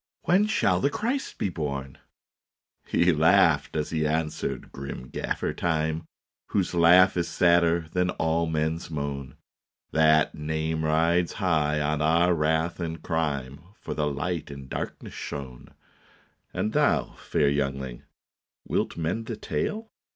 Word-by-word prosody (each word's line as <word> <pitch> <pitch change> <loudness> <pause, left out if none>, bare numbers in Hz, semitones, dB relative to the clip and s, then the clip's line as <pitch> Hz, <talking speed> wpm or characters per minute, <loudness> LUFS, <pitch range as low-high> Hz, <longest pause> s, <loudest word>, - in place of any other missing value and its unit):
When 190 +6 +3
shall 90 - +2
the 140 - +2
Christ 235 - -2
be 100 - -1
born? 70 -5 -4 0.4
" - - -42
He 90 +1 +4
laughed 80 +2 +4
as 75 -1 -2
he 80 -2 0
answered, 80 0 -2
grim 65 -2 -7
Gaffer - - -2
Time, 80 -1 -1 0.4
Whose 95 -3 0
laugh 90 +2 +6
is 85 - 0
sadder 85 -2 +3
than 90 0 +1
all 80 0 0
men 80 0 0
s 85 - -10
moan. 70 -4 -4 0.3
" - - -55
That 80 -1 +4
name 80 +1 -2
rides 80 +3 +2
high 75 -6 +1
on 75 0 0
our 85 +3 +4
wrath 80 +2 0
and 80 -1 -4
crime, 75 -4 -2 0.2
For - - -5
the 75 -1 0
Light 75 +3 -3
in 70 -2 -9
darkness - - -6
shone. 65 -4 -7 0.4
" - - -34
And 110 - -2
thou, - - +2
fair 70 - +1
youngling, 70 -3 -2 0.7
wilt - - -1
mend 90 +8 -2
the 115 - -3
tale? 210 - -3
80 Hz, 145 wpm, -26 LUFS, 75-85 Hz, 0.7 s, laugh